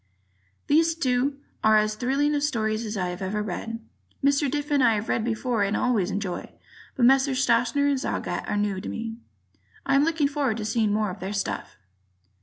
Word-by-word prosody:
These 325 +2 +3
two 270 -2 0 0.3
are 215 0 +6
as 215 0 +2
thrilling 280 +6 +1
stories 225 -5 -1
as 210 -1 -4
I 180 -2 -1
have 180 +1 -6
ever 205 +2 -2
read. 225 +4 -4 0.5
Mr. 280 0 +3
Diffin 290 0 0
I've 225 -3 +2
read 225 - +1
before 235 0 -1
and 200 +1 +1
always 220 -7 +1
enjoyed; 195 -2 -4 0.5
but 245 - +3
Messrs. 270 0 +4
Schachner 240 +4 +2
and 280 -2 +1
Zagat - - -3
are 205 - 0
new 205 -2 -1
to - - -6
me. 225 0 -5 0.7
I - - +1
am 275 +1 +5
looking 320 -2 +2
forward 280 -5 -1
to 215 - -4
seeing 220 -1 +1
more 210 -1 0
of 200 - -9
their 190 +3 -4
stuff. 100 - -3
230 Hz, 185 wpm, -25 LUFS, 210-275 Hz, 0.7 s, are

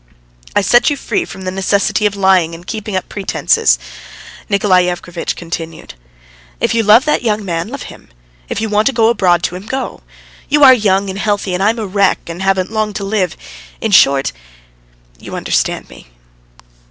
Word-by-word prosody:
"I 205 - +4
set 240 +7 +4
you 290 - -2
free 355 +6 -2
from 190 - -10
the 185 - -3
necessity 200 +2 +1
of 205 - -4
lying 190 -4 +2
and 170 +2 -13
keeping 215 0 -5
up 185 - -2
pretences," 195 -2 +1 0.7
Nikolay 190 -3 +3
Yevgrafitch 175 -1 -4
continued. 165 - -7 0.7
"If - - 0
you 230 - +2
love 220 +5 +5
that 300 - +1
young 215 -3 -1
man, 170 0 -2
love 265 +3 -7
him; - - -13 0.4
if - - -3
you 220 - -1
want 210 0 +1
to 270 - +1
go 225 -1 +3
abroad 180 -7 +2
to 180 - -2
him, 190 +4 -9
go. 265 +2 -4 0.5
You 295 +1 +3
are 260 -2 +10
young, 195 -4 +1
healthy, 200 -2 -1
and 180 - -2
I 205 - +4
am 230 - -1
a 220 - -3
wreck, 200 0 +2
and 170 +2 -7
haven't 190 0 0
long 215 -1 -1
to 200 - -5
live. 195 -4 -1 0.4
In 220 - -2
short... 140 -7 +4 0.9
you - - -8
understand - - -1
me." - - -15
200 Hz, 185 wpm, -15 LUFS, 185-220 Hz, 0.9 s, are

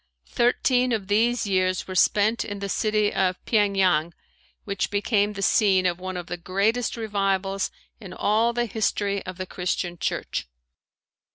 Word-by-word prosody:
Thirteen 250 +1 +2
of 200 -3 -3
these 235 +4 +2
years 185 -2 0
were 185 - -5
spent 210 +4 +3
in 205 - -6
the 200 0 -4
city 215 0 +1
of 185 -1 +1
Pyeng 205 -3 +2
Yang 170 -3 +2 0.5
which 200 -2 -2
became 205 0 +1
the 195 -1 -4
scene 190 -2 +3
of 175 -1 0
one 185 0 -5
of 175 - -5
the 175 +1 -5
greatest 205 +8 0
revivals 195 -3 -1 0.3
in 195 -5 -10
all 220 +5 +1
the 240 0 -1
history 200 -2 -1
of 185 -1 -6
the 185 - -4
Christian 180 -1 -3
church. - - -3
200 Hz, 160 wpm, -24 LUFS, 185-215 Hz, 0.5 s, spent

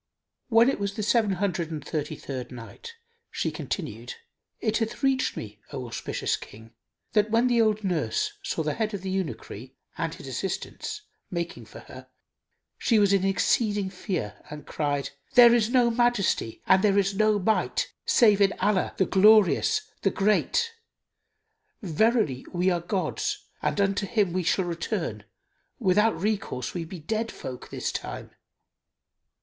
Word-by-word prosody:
When 230 0 +6
it 270 - +1
was 200 0 -2
the 215 - -3
Seven 220 -2 +2
Hundred 180 -3 -1
and 155 -3 -6
Thirty 155 0 -3
third 130 -4 -6
Night, 125 - -10 0.3
She - - -2
continued, 485 - -5 0.4
It 220 -1 0
hath 225 +3 -3
reached 270 -1 +1
me, 105 -1 -7
O 130 -3 -5
auspicious 120 - -2
King, 110 +2 -13 0.4
that 210 0 +3
when 230 +3 +3
the 240 -2 +3
old 215 -1 +1
nurse 415 - -1
saw 280 - -2
the 150 -1 -1
head 215 -2 -2
of 195 - -7
the 190 - -3
eunuchry 190 -5 -5 0.2
and - - -1
his - - -11
assistants 425 -1 -4 0.3
making 170 -1 -4
for - - -12
her - - -12 0.7
she 230 - +3
was 200 -1 +4
in 195 -1 +3
exceeding 200 0 +1
fear 180 - -4
and 150 0 -8
cried, 145 -2 -2 0.2
"There 240 -1 +9
is 230 -2 +3
no 245 -2 +4
Majesty 230 - +1
and 190 0 +4
there 200 -1 +4
is 195 0 +2
no 215 +1 +3
Might 215 +3 0
save 210 -5 +4
in 200 0 +4
Allah, 195 -1 0
the 190 - +3
Glorious, 215 - +5 0.2
the 195 - +3
Great! 215 - +1 1.1
Verily 195 - +1
we 180 +1 +1
are 175 -1 0
God's 195 - -2 0.2
and - - -1
unto 200 0 +1
him 200 -4 +1
we 185 - 0
shall 185 +2 +1
return; 170 -1 -3 0.5
without 210 0 +2
recourse 195 -11 -2
we 170 -2 -3
be 180 +3 -8
dead 220 +8 -2
folk 125 -1 -8
this - - -3
time." - - -6
200 Hz, 155 wpm, -26 LUFS, 170-225 Hz, 1.1 s, There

